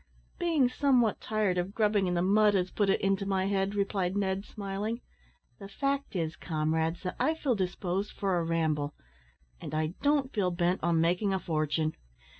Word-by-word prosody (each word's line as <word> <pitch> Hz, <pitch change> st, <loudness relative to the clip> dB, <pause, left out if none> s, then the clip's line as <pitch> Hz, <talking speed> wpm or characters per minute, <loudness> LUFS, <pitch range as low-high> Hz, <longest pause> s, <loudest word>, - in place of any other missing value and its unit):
"Being 325 Hz, -7 st, +3 dB
somewhat 250 Hz, -4 st, +2 dB
tired 210 Hz, -5 st, 0 dB
of 185 Hz, +3 st, -3 dB
grubbing 210 Hz, -3 st, +2 dB
in 180 Hz, -, 0 dB
the 175 Hz, -, +1 dB
mud 205 Hz, +2 st, +4 dB
has 185 Hz, -1 st, 0 dB
put 205 Hz, -2 st, +1 dB
it 195 Hz, -, +3 dB
into 195 Hz, 0 st, +1 dB
my 190 Hz, -1 st, +1 dB
head," 195 Hz, 0 st, 0 dB
replied 195 Hz, -2 st, 0 dB
Ned, 195 Hz, -1 st, 0 dB
smiling. 205 Hz, +2 st, -4 dB, 0.6 s
"The 195 Hz, -, -8 dB
fact 275 Hz, +2 st, -2 dB
is, 165 Hz, -2 st, -1 dB
comrades, 160 Hz, +2 st, -1 dB
that 180 Hz, -, -3 dB
I 315 Hz, -, +2 dB
feel 285 Hz, -5 st, 0 dB
disposed 190 Hz, 0 st, -2 dB
for 190 Hz, -3 st, 0 dB
a -, -, -1 dB
ramble, 155 Hz, -3 st, 0 dB, 0.7 s
and 155 Hz, -, -5 dB
I 155 Hz, +1 st, 0 dB
don't 285 Hz, -2 st, +2 dB
feel 200 Hz, -4 st, +1 dB
bent 175 Hz, +1 st, 0 dB
on 165 Hz, -1 st, +2 dB
making 180 Hz, +4 st, +1 dB
a -, -, -1 dB
fortune. 155 Hz, -2 st, -1 dB
195 Hz, 180 wpm, -30 LUFS, 170-210 Hz, 0.7 s, mud